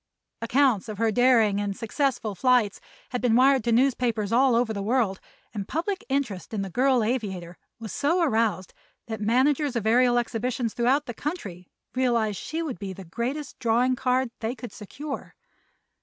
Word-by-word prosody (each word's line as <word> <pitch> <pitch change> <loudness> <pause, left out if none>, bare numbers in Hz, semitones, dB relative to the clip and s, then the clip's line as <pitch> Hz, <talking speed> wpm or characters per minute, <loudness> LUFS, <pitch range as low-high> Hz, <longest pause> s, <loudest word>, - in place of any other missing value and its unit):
Accounts 240 -3 +2
of 210 - -5
her 225 +1 +2
daring 225 -4 +4
and 200 -1 -3
successful 235 -2 -1
flights 240 -1 +2 0.3
had 250 - -3
been 240 -2 +3
wired 265 0 +5
to 235 - +1
newspapers 235 -4 +1
all 250 +1 +4
over 230 -1 +1
the 200 - -4
world 215 -3 0 0.3
and 200 -3 -4
public 375 +6 -2
interest 235 -8 -2
in 200 - -1
the 195 - -6
girl 255 +2 +3
aviator 195 -7 -3 0.2
was 220 -3 -7
so 315 +5 +1
aroused 220 - 0 0.3
that 220 -3 -6
managers 260 +5 +2
of 230 -3 -1
aerial 245 +2 +4
exhibitions 240 0 -1
throughout 260 +5 +2
the 240 - -5
country 210 - -6 0.3
realized 235 -5 +1
she 325 +2 -4
would 270 - -5
be 195 -1 -5
the 190 0 -10
greatest 255 - -4
"drawing 245 +2 +2
card" 255 -1 0
they 230 +3 -3
could 245 0 -8
secure. 270 +7 -8
240 Hz, 170 wpm, -26 LUFS, 215-260 Hz, 0.3 s, wired